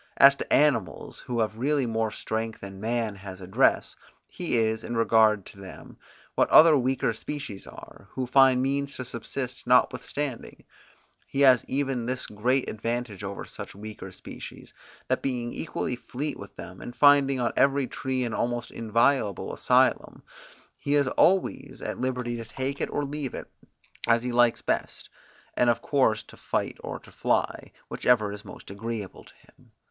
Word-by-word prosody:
As 140 0 +9
to - - -6
animals 120 - +1
who 120 -2 -2
have 110 0 -2
really 140 +1 +1
more 115 -1 0
strength 110 +1 -4
than 95 -1 -9
man 115 -2 -1
has 95 -1 -9
address, 95 0 +1 0.3
he 175 -9 -2
is, 110 -1 +1
in 120 - -4
regard 110 -3 +4
to 100 - -14
them, 95 - -11 0.4
what - - +2
other 160 0 +8
weaker 130 -3 +1
species 120 -3 -7
are, - - -13
who 130 - -2
find 130 0 +5
means 140 +1 -1
to 130 - -5
subsist 125 +2 -5
notwithstanding; 125 +1 0 0.6
he 135 - -2
has 130 -3 +6
even 135 -3 -1
this 130 0 -2
great 125 +5 0
advantage 115 -2 -4
over 100 0 -5
such - - -9
weaker 105 -2 -9
species, - - -10 0.3
that - - 0
being 120 -3 -2
equally 130 -5 -3
fleet 140 +4 -5
with - - -11
them, - - -10
and 120 - -8
finding 140 -2 +5
on 120 - 0
every 140 0 +3
tree 130 0 -2
an 115 -2 -3
almost 120 +1 -2
inviolable 115 -2 +1
asylum, - - +2 0.6
he 145 - 0
is 140 -2 +3
always 190 +7 +1
at - - -5
liberty 125 -2 -2
to 115 - -5
take 135 +5 -4
it - - -1
or 145 - -2
leave 145 -1 -4
it, - - -7 0.6
as 115 0 +3
he 125 - -2
likes 120 -1 +3
best, - - -3 0.4
and 125 - +3
of 120 - +1
course 110 -7 +2
to - - -15
fight - - -3
or - - -5
to - - -17
fly, - - -1 0.2
whichever 110 -5 +2
is 105 +1 -8
most 100 - -11
agreeable 105 -1 -6
to - - -18
him. - - -25
120 Hz, 165 wpm, -27 LUFS, 110-135 Hz, 0.6 s, As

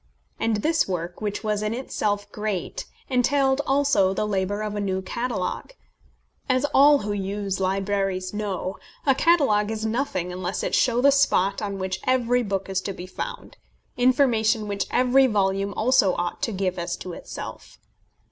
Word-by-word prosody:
And 220 -2 0
this 320 0 +2
work, 175 0 -4
which 210 0 -3
was 210 -1 0
in 215 +2 -1
itself 205 -5 -2
great, 210 -4 -3 0.2
entailed 265 +1 +2
also 270 -9 +3
the 215 - 0
labour 205 0 -1
of 210 -1 -3
a - - -2
new 190 -1 -1
catalogue. 235 - -3 0.8
As 255 +1 +2
all 285 +1 +6
who 205 0 -2
use 200 0 -3
libraries 195 -1 -1
know, 200 -3 -3 0.3
a 275 - +5
catalogue 265 -10 +3
is 220 0 -3
nothing 220 -7 -2
unless 180 +1 -3
it - - -2
show 245 -1 +3
the 280 +2 +6
spot 200 -8 +2
on 200 -2 -3
which 190 0 -3
every 245 -1 +2
book 195 -4 -2
is 190 -1 -1
to 195 - -4
be 180 - -8
found, 185 - -7 0.4
information 235 -4 +2
which 200 -1 -2
every 255 +2 +4
volume 195 -2 0
also 215 -5 +3
ought 175 0 -3
to 230 - 0
give 185 -2 -2
as 175 0 -3
to 180 - -7
itself. - - -8
210 Hz, 165 wpm, -24 LUFS, 190-245 Hz, 0.8 s, all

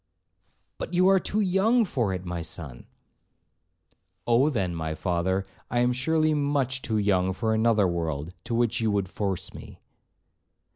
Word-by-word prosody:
'—'But 175 - -4
you 180 +1 +5
are 195 0 +5
too 210 +4 -1
young 210 +5 +3
for 120 - -1
it, 95 0 -4
my 90 -1 -4
son.' 80 -6 -8 1.4
'Oh, 120 +5 +4
then, 95 - -1
my 80 -1 -3
father, 90 +4 -1 0.2
I 120 - -1
am 125 0 +2
surely 155 +4 +1
much 140 -3 0
too 110 -4 -1
young 95 -3 +2
for 110 +3 -1
another 110 -3 +3
world, 80 -2 -3
to 120 -1 -2
which 120 -1 +1
you 110 - +1
would 100 -2 0
force 95 0 -3
me.' 105 -5 -11
110 Hz, 155 wpm, -26 LUFS, 90-135 Hz, 1.4 s, you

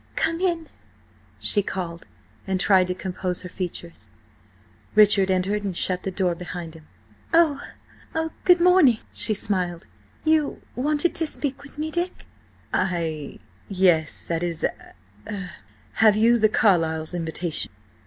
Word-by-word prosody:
"Come 330 +1 0
in!" 340 -4 0 0.7
she 205 - +2
called, 175 -4 -5 0.4
and 190 -1 0
tried 185 -1 +4
to 180 - -2
compose 180 -1 -3
her 180 - -7
features. 175 -2 -6 0.9
Richard 205 -2 +6
entered 190 +3 0
and 190 -4 -3
shut 185 -1 -1
the - - -3
door 185 -2 0
behind 175 -1 -7
him. 160 -2 -15 0.5
"Oh–oh–good 320 +2 0
morning!" 345 -9 +5 0.2
she 215 - +5
smiled. 180 -3 -2 0.4
"You–wanted 300 0 0
to 325 - 0
speak 280 -2 -3
with 285 +1 -12
me–Dick?" 345 +4 -3 0.5
"I–yes–that 170 0 -1
is–er–have 175 - -3
you 235 +2 +4
the 215 0 +4
Carlyles' 165 -7 +2
invitation?" 165 -1 -2
190 Hz, 110 wpm, -24 LUFS, 175-280 Hz, 0.9 s, Richard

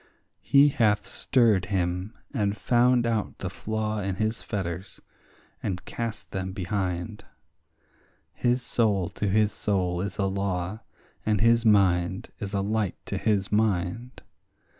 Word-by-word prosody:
He 140 +1 +5
hath 110 -6 +2
stirred 115 -8 +2
him, 90 +1 -2 0.2
and 105 -5 0
found 120 +1 +3
out 115 -3 -1
the 90 - -4
flaw 110 +2 -2
in 95 -2 -2
his 110 +3 -1
fetters, 95 -3 -4 0.6
and 90 -1 -3
cast 115 -2 -4
them 95 -1 -3
behind; 95 +1 -3 1.1
His 125 +1 +1
soul 100 -8 +1
to 105 - -3
his 105 +2 +3
soul 90 -5 -1
is 100 0 -4
a 100 - +1
law, 95 0 -2 0.4
and 105 -2 +1
his 115 +2 +4
mind 95 -3 +3
is 100 0 -4
a 100 - +1
light 105 -1 -1
to - - -3
his 100 -3 +1
mind. 110 +3 0
105 Hz, 135 wpm, -26 LUFS, 95-110 Hz, 1.1 s, He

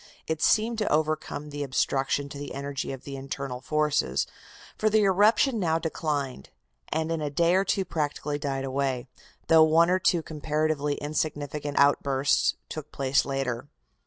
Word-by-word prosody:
It 160 -1 -3
seemed 225 +1 +3
to 215 - 0
overcome 155 -1 -1
the 145 0 -5
obstruction 140 +1 0
to 140 - -8
the 145 - -6
energy 140 0 -4
of 135 -2 -7
the 140 - -7
internal 135 -1 -5
forces, 150 0 +1 0.5
for 215 - +1
the 215 0 +3
eruption 210 +5 +4
now 165 -4 +2
declined, 145 - -3 0.4
and 160 +1 -1
in 165 -1 -1
a 150 - -1
day 170 +4 +2
or 190 +1 +4
two 195 0 0
practically 150 -2 -2
died 135 -2 -2
away, 135 -2 -1 0.4
though 160 -1 +6
one 165 +2 +5
or 185 - +3
two 175 -3 +2
comparatively 150 -1 -1
insignificant 145 -1 -3
outbursts 140 -1 +3
took 155 -1 -7
place 135 0 +1
later. 135 -2 -2
150 Hz, 160 wpm, -27 LUFS, 140-160 Hz, 0.5 s, though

